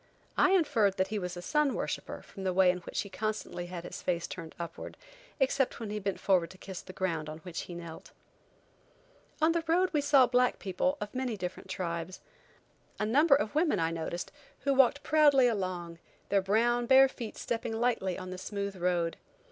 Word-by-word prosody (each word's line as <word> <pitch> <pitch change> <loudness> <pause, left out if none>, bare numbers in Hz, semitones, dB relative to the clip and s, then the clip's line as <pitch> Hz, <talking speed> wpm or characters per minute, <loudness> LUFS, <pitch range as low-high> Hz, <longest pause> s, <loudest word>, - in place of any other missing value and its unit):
I 375 - +4
inferred 230 - +3
that 190 0 +1
he 215 0 -2
was 180 -1 -5
a 175 - -7
sun 300 +2 +1
worshipper - - -4
from 195 - -10
the 185 -1 -1
way 185 -1 +6
in 180 - -5
which 175 - -3
he - - -7
constantly 210 -3 -3
had 175 -1 -6
his - - -7
face 175 -2 -1
turned 165 -3 -8
upward, 170 -1 -7 0.4
except 270 -1 +1
when 220 -3 -5
he 210 - -2
bent 195 -1 -3
forward 185 -4 +2
to 185 - -13
kiss 190 -1 -8
the - - -10
ground 165 -5 -2
on 155 - -6
which 175 -1 -5
he 175 - -8
knelt. 170 -2 -9 1.3
On 320 - +5
the 335 0 0
road 360 +3 +3
we 300 - +2
saw 280 -2 +6
black 250 +1 +2
people 240 +10 -1
of 210 - -5
many 255 -4 -2
different 180 0 -6
tribes. 170 -1 -4 0.8
A - - +1
number 280 +7 +5
of 210 -3 -1
women 310 - +2
I 165 0 +1
noticed, 165 +1 -4 0.3
who 275 - +2
walked 270 +2 +4
proudly 290 -5 +5
along, 180 -6 -3 0.3
their 200 -1 +3
brown, 235 +5 +2
bare 265 +1 +8
feet 235 -4 -7
stepping 225 -1 -3
lightly 230 -7 0
on 185 0 -7
the 185 - -6
smooth 200 0 -4
road. 175 -2 0
200 Hz, 195 wpm, -30 LUFS, 180-260 Hz, 1.3 s, bare